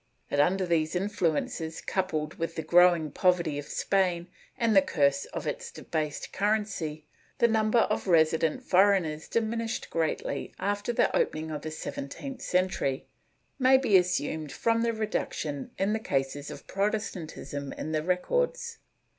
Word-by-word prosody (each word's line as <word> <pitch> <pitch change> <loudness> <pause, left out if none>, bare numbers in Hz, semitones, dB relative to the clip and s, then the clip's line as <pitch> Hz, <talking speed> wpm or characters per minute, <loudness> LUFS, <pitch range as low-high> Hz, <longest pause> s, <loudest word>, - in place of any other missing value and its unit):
^ - - -44 0.3
That, 145 - +1
under 185 +5 +3
these 165 -1 +1
influences, 170 -4 -1
coupled 155 -5 -2
with 165 0 -2
the 160 - -3
growing 170 -2 +5
poverty 170 -4 +2
of 145 - -8
Spain 180 -3 0 0.3
and 230 -2 +2
the 195 - +8
curse 140 -6 +1
of - - -6
its - - -3
debased 155 -3 -4
currency, 200 -7 -1 0.3
the 235 - +5
number 220 +1 +3
of - - -1
resident 160 -2 +3
foreigners 180 -5 +3
diminished 230 0 -2
greatly 165 -2 -2
after 205 +4 -1
the 235 - +2
opening 155 0 0
of 150 - -4
the 155 - -5
seventeenth 155 - -6
century, 180 -7 0 0.5
may 260 0 +6
be 260 -7 +2
assumed 160 -4 +1
from 230 +11 +1
the 235 0 +2
reduction 215 - -3
in 195 +2 +1
the 220 - 0
cases 140 -5 -2
of - - -9
Protestantism 180 -9 -3
in 155 - -5
the 155 -1 0
records. 475 - -1
180 Hz, 145 wpm, -28 LUFS, 155-210 Hz, 0.5 s, the